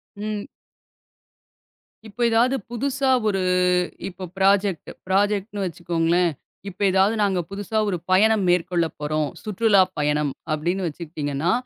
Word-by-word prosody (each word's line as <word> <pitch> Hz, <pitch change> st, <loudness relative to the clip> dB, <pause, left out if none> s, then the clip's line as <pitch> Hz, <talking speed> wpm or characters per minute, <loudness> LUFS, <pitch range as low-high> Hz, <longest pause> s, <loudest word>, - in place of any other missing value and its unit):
ம். 210 Hz, 0 st, -4 dB, 1.6 s
இப்ப 215 Hz, -, -18 dB
எதாவது 235 Hz, +4 st, +3 dB
புதுசா 265 Hz, +2 st, -1 dB, 0.2 s
ஒரு 195 Hz, -2 st, 0 dB, 0.7 s
இப்ப 185 Hz, 0 st, -7 dB
ப்ராஜக்ட் 195 Hz, -3 st, +2 dB, 0.2 s
ப்ராஜக்ட்ன்னு 205 Hz, +1 st, 0 dB
வச்சுக்கோங்களேன். 170 Hz, 0 st, 0 dB, 0.4 s
இப்ப 185 Hz, -, -14 dB
எதாவது 195 Hz, +4 st, +3 dB
நாங்க 195 Hz, -3 st, +1 dB
புதுசா 205 Hz, +2 st, -4 dB
ஒரு 180 Hz, -, -1 dB
பயணம் 215 Hz, +2 st, +4 dB
மேற்கொள்ளப் 175 Hz, -2 st, +1 dB
போறோம். 150 Hz, 0 st, -1 dB, 0.2 s
சுற்றுலா 210 Hz, -1 st, +3 dB, 0.2 s
பயணம் 150 Hz, -1 st, 0 dB, 0.2 s
அப்படின்னு 175 Hz, +5 st, -1 dB
வச்சுக்கிட்டீங்கன்னா, 150 Hz, -1 st, -3 dB
190 Hz, 110 wpm, -23 LUFS, 170-210 Hz, 1.6 s, பயணம்